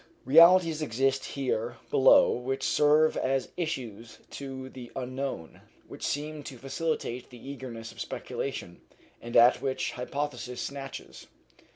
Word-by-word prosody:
Realities 165 +2 +6
exist 135 0 0
here 120 -4 -2
below 135 0 +6
which 130 +2 -3
serve 150 +1 +4
as 135 0 0
issues 120 - -5
to 135 -1 -7
the 125 -2 -10
unknown, 130 -9 -5 0.3
which - - -11
seem 150 +1 -3
to 130 - -8
facilitate 135 -2 -3
the 125 +2 -9
egress 115 -4 -8
of - - -9
speculation, 90 -10 -5 0.4
and 120 0 -1
at 120 +1 +6
which 135 -1 -1
hypothesis 125 -1 -4
snatches. 135 -1 -7
135 Hz, 120 wpm, -28 LUFS, 125-145 Hz, 0.4 s, Realities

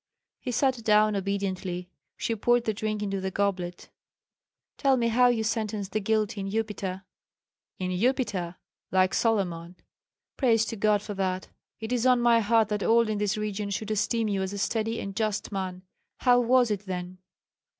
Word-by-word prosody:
He 250 - -4
sat 255 -1 +1
down 215 -1 +4
obediently; 190 -2 -2 0.3
she 230 - -1
poured 240 +2 +2
the 220 - 0
drink 215 0 -2
into 195 -1 -2
the 190 - -2
goblet. 185 -3 -2 0.9
"Tell 270 -2 +3
me 235 -1 +1
how 245 +2 +5
you 235 -2 +2
sentenced 215 -3 -2
the 215 - 0
guilty 215 0 0
in 195 - -4
Upita." 200 -3 -3 0.7
"In 185 -1 -2
Upita? 190 -4 0 0.3
Like 185 0 +3
Solomon!" 180 -6 0 0.6
"Praise 225 -4 +3
to 230 - -4
God 210 -1 +2
for 210 - -5
that! 185 -1 -2 0.3
It 220 +1 -5
is 250 0 +2
on 250 -1 +5
my 240 -1 +5
heart 225 0 +3
that 210 -1 -1
all 230 +1 +3
in 210 -1 -1
this 210 0 0
region 210 -1 -3
should 210 +2 -3
esteem 220 +2 0
you 200 -2 0
as 190 +1 -3
a - - -4
steady 225 +2 -1
and 195 -1 -6
just 215 -1 -1
man. 185 -2 -4 0.3
How 245 -1 +4
was 245 -1 +3
it 205 -1 -3
then?" 180 0 -5
210 Hz, 175 wpm, -27 LUFS, 195-230 Hz, 0.9 s, how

